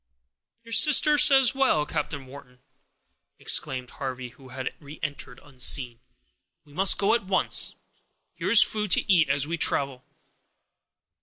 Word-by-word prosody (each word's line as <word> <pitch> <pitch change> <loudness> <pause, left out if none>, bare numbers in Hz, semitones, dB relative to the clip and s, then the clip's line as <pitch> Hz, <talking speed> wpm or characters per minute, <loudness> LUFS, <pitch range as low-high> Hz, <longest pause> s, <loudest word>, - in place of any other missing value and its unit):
"Your 230 - -15
sister 300 +2 +5
says 270 -3 +5
well, 265 - +1
Captain 145 -3 -5
Wharton," 130 -1 -15 0.8
exclaimed 125 -1 -1
Harvey, 130 -2 -7
who 130 +2 -18
had 130 0 -6
reentered 145 -3 -8
unseen; 125 -3 -1 0.7
"we 145 - -20
must 195 +5 +2
go 205 +2 +1
at 235 -4 -1
once. 190 -1 -1 0.6
Here - - -5
is 230 - +6
food 210 -1 -3
to - - 0
eat, 160 -5 +2
as 140 0 0
we 170 +2 -5
travel." 135 -5 -1
145 Hz, 135 wpm, -25 LUFS, 130-200 Hz, 0.8 s, is